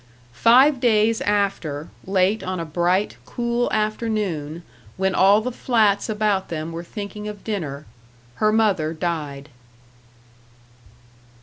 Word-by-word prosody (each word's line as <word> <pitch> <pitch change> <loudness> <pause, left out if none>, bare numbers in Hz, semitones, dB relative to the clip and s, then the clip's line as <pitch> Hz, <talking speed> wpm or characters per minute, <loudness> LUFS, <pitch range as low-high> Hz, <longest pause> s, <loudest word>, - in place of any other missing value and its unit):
Five 255 - +5
days 225 -2 +2
after, 195 -7 -1 0.2
late 190 +2 +2
on 185 -1 -4
a 165 - -3
bright, 175 +5 0
cool 240 0 -1
afternoon, 210 -8 -2 0.3
when 190 0 +1
all 200 +3 +5
the 250 +3 -3
flats 220 -4 +1
about 210 -3 0
them 160 0 -4
were 165 +1 -6
thinking 210 +2 -7
of 210 -2 -8
dinner, 155 -9 -4 0.5
her 215 0 +3
mother 195 -8 +1
died. 150 -4 -4
200 Hz, 115 wpm, -22 LUFS, 170-215 Hz, 0.5 s, Five